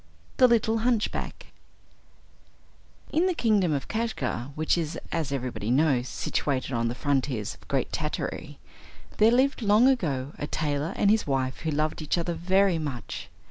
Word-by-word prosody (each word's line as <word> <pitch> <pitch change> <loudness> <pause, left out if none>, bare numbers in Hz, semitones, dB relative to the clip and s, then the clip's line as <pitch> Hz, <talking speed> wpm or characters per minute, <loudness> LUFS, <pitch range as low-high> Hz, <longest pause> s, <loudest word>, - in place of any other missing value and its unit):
The 255 - +7
Little 225 -1 +2
Hunchback 230 -2 -2 1.6
In 330 +4 +3
the 365 - 0
kingdom 210 - +2
of 140 -3 -2
Kashgar, 145 - -2
which 155 0 +1
is, 165 -1 -2
as 160 -4 -2
everybody 125 -5 -3
knows, 130 -1 +2
situated 135 -2 -2
on 115 -1 +1
the 120 - -3
frontiers 135 -6 -1
of - - -20
Great - - -1
Tartary, - - -4 0.6
there 215 - +6
lived 260 +3 +2
long 215 +3 +5
ago 150 - 0
a 145 - -3
tailor 150 0 -1
and 200 - +3
his 220 -5 +1
wife 130 -2 -1
who 160 - -3
loved 155 +2 -1
each 155 +3 0
other 170 0 -1
very 185 +1 +2
much. 135 -7 -5
155 Hz, 155 wpm, -27 LUFS, 135-215 Hz, 1.6 s, The